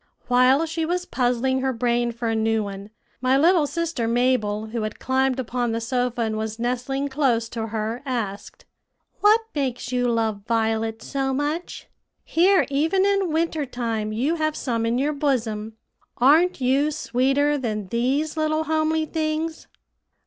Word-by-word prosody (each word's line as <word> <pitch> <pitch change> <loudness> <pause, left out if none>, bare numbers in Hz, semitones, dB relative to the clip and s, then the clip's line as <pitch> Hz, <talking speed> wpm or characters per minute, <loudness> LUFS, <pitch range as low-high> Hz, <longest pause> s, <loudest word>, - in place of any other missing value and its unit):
While 255 +5 +4
she 325 0 -3
was 355 +2 -1
puzzling 255 +1 0
her 265 0 +1
brain 240 0 0
for 235 0 -4
a 225 - 0
new 220 0 +1
one, 200 0 -7 0.3
my 255 +1 +3
little 325 +1 +4
sister 330 -8 -2
Mabel, 230 -3 +1
who 230 0 -3
had 215 0 -4
climbed 265 0 +1
upon 245 -1 -1
the 230 - -1
sofa 245 0 -1
and 220 -1 -1
was 220 0 -4
nestling 250 +4 -2
close 265 -5 +1
to 225 -1 -4
her, 220 +2 -3
asked, 220 -7 -5 0.5
"What 425 +2 +5
makes 255 -4 -2
you 250 -1 +1
love 225 -3 0
violets 225 -1 0
so 270 -1 -1
much? 295 +5 -3 0.4
Here 370 +3 +3
even 320 +8 +2
in 395 -3 +1
winter 320 -2 0
time 230 -4 -3
you 270 +10 0
have 310 -1 0
some 230 -3 -1
in 235 +1 +1
your 290 +3 0
bosom. 225 -7 -2 0.4
Aren't 310 +8 +4
you 270 +3 +2
sweeter 285 0 +1
than 215 -5 -3
these 270 - 0
little 310 0 0
homely 315 0 +1
things?" 315 0 -3
255 Hz, 155 wpm, -23 LUFS, 230-305 Hz, 0.5 s, What